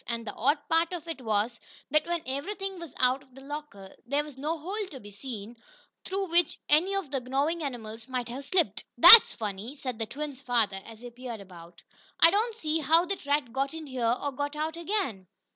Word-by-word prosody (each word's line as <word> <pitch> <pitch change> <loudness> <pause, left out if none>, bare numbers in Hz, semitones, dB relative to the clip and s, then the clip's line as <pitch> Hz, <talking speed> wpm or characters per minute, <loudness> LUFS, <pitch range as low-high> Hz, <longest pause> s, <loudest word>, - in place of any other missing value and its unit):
And, 235 -1 -3
the 210 - -5
odd 285 +7 +2
part 330 +2 +2
of 340 -2 -6
it 325 -5 -5
was 220 +1 0 0.3
that, 305 +2 +3
when 340 -1 -1
everything 380 +8 -4
was 335 -6 -9
out 255 +1 +3
of 260 -2 -22
the 270 - -12
locker, 275 -9 -8
there 285 +3 +1
was 295 -3 -11
no 300 +5 -2
hole 390 +6 -4
to 270 - -9
be 205 -3 -12
seen, 220 0 -7 0.5
through 390 +1 -2
which 345 -2 +2
any 350 +7 +3
of 380 -9 -3
the 275 - 0
gnawing 280 +7 -1
animals 230 -5 -6
might 250 -2 -3
have 260 +4 -7
slipped. 355 +1 +1
"That's 460 - +11
funny," 215 +4 -5
said 255 -5 -5
the 225 - -2
twins' 285 0 -6
father, 225 -7 0
as 225 0 -12
he 245 0 -9
peered 240 -2 -7
about. 175 -3 -13 0.4
"I 330 - +8
don't 440 +3 +1
see 315 -7 -1
how 325 +4 +4
that 385 -6 -4
rat 285 -4 +1
got 275 +3 -1
in 320 -1 -7
here, 245 -3 0
or 285 - -2
got 285 +2 -3
out 310 +1 -2
again." 335 - -2
275 Hz, 210 wpm, -28 LUFS, 235-325 Hz, 0.5 s, That's